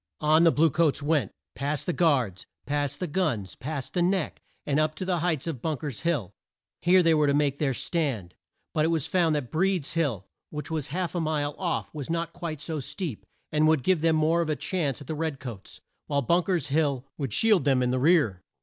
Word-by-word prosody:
On 155 +2 +5
the 165 - +7
blue 160 +1 +3
coats 155 -3 +1
went, 145 -8 +1 0.2
past 145 +2 -2
the 175 - 0
guards, 130 - +1 0.2
past 145 -1 -1
the 180 - -1
guns, 145 - -1
past 140 0 -5
the 180 - +1
Neck, 180 -1 0 0.2
and 145 +1 +1
up 155 0 +1
to 185 - -4
the 180 -2 0
heights 160 -4 0
of 155 -8 -4
Bunk 160 -2 -2
er's 140 -7 -4
Hill. 150 - -1 0.5
Here 180 +1 +5
they 165 -1 +5
were 150 -2 +3
to 140 - +3
make 145 -1 +1
their 135 -4 +1
stand, 120 - -1 0.4
but 155 - +2
it - - +3
was 165 -4 0
found 170 -4 +2
that 135 -5 -3
Breed's 180 -3 0
Hill, 140 - 0 0.2
which 150 +2 -6
was 155 -4 -2
half 175 +4 -3
a 175 - -1
mile 150 -2 -1
off, 175 -3 -2
was 150 -2 -6
not 165 0 -2
quite 170 -4 -5
so 155 +1 -4
steep, 145 - -5 0.2
and 155 0 +3
would 155 -4 +3
give 180 +1 +2
them 165 0 +3
more 160 +2 +3
of 165 - -2
a 155 - +1
chance 150 -5 -2
at - - -9
the 160 - -4
red 155 -3 -3
coats, 120 -7 -9 0.3
while 140 -1 0
Bunk 170 +7 +2
er's 170 -7 0
Hill 140 -3 +1
would 135 -5 -2
shield 210 - +4
them 130 -3 +3
in 125 - +1
the 130 - +1
rear. 140 - +3
155 Hz, 225 wpm, -27 LUFS, 140-170 Hz, 0.5 s, the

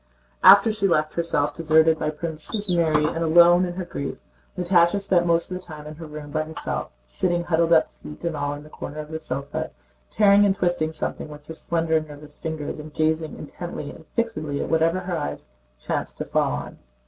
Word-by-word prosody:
After 200 +3 +8
she 210 -2 0
felt 155 -3 +1
herself 165 -4 +1
deserted 160 0 +3
by - - 0
Princes 170 +5 -2
Mary 155 -3 +3
and 165 - -1
alone 175 +2 +6
in 175 - -4
her 185 0 -5
grief, 140 -4 -5 0.4
Natásha 175 +1 +3
spent 185 -3 +2
most 170 +1 +2
of 180 - -2
the - - -17
time 155 -3 -10
in 150 - -7
her 165 -1 -8
room 150 -1 -9
by 155 +1 0
herself, 155 0 -4 0.2
sitting 170 - -1
huddled 170 -1 +1
up 160 -1 +4
feet 150 - -10
and 170 -2 -1
all 145 0 -2
in 145 - -10
the 150 - -14
corner 150 - -7
of 155 0 -7
the 160 - -4
sofa, 140 -1 -4 0.4
tearing 205 -1 +5
and 195 -1 +3
twisting 175 -4 0
something 155 - -4
with 150 -1 -11
her 160 - -8
slender 165 0 0
nervous 150 -1 -11
fingers 160 -2 -5
and 150 0 -10
gazing 160 0 0
intently 155 -1 -7
and 160 - -14
fixedly 155 -12 -2
at - - -3
whatever 165 +3 +2
her 180 -1 -3
eyes 75 - -4 0.3
chanced - - -3
to - - -4
fall - - +1
on. - - -6
160 Hz, 205 wpm, -24 LUFS, 150-175 Hz, 0.4 s, After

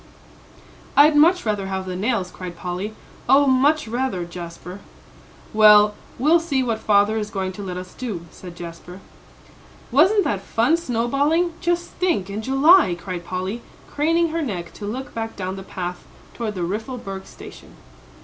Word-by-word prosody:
"I'd 295 +1 +7
much 335 +3 +5
rather 205 -3 -1
have 190 -1 -3
the 185 -1 -5
nails," 200 -2 -1
cried 180 -2 -8
Polly, 185 +4 -5 0.3
"oh, 275 +2 +6
much 275 +2 +3
rather, 235 -6 -2
Jasper." 175 +2 -9 0.7
"Well, 210 -1 +7 0.2
we'll 310 +6 +4
see 285 -6 0
what 230 -3 -1
father 210 +1 +3
is 210 -1 -4
going 190 -2 -3
to 190 - -9
let 185 -2 -5
us 180 0 -8
do," 205 -10 -5
said 180 -2 -11
Jasper. 175 +1 -9 0.9
"Wasn't 375 - +5
that 205 - -1
fun 235 +10 +2
snowballing 290 +5 0
just 345 0 -1
think 210 - -1
in 210 +2 -4
July," 270 - +5
cried 175 0 -6
Polly, 185 +6 -4 0.3
craning 330 +3 +2
her 330 +1 -2
neck 185 - -4
to 205 - -7
look 260 +6 -5
back 225 0 -4
down 185 -1 -4
the 195 - -7
path 180 -2 -6 0.3
toward 220 -3 -4
the 180 - -3
Riffelberg 195 0 -5
station. - - -13
215 Hz, 160 wpm, -22 LUFS, 185-275 Hz, 0.9 s, I'd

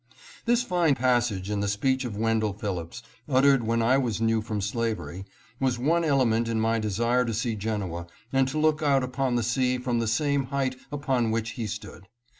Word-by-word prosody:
This 240 +1 +3
fine 175 - +2
passage 120 -6 +1
in 105 - -1
the 100 - -1
speech 130 +6 0
of 110 -4 -5
Wendell 110 -1 +1
Phillips, 100 +1 -5 0.3
uttered 135 0 +4
when 115 +1 +1
I 130 +4 +4
was 115 -6 -1
new 115 -1 +2
from 110 -1 -3
slavery, 105 -2 -3 0.3
was 130 -2 +1
one 165 +7 +2
element 125 -7 +2
in 115 -1 0
my 115 +1 +1
desire 115 +4 +1
to 115 -2 -2
see 115 0 -1
Genoa 100 -5 -3 0.3
and 135 0 +3
to 135 +4 -3
look 155 0 +2
out 140 -3 +3
upon 130 0 -1
the 120 - +1
sea 125 +2 +1
from 125 -1 -1
the 115 - -1
same 140 +4 +1
height 135 -1 -1 0.2
upon 135 -5 0
which 115 +1 -1
he 115 -3 -4
stood. 105 -2 -8
120 Hz, 195 wpm, -26 LUFS, 110-135 Hz, 0.3 s, uttered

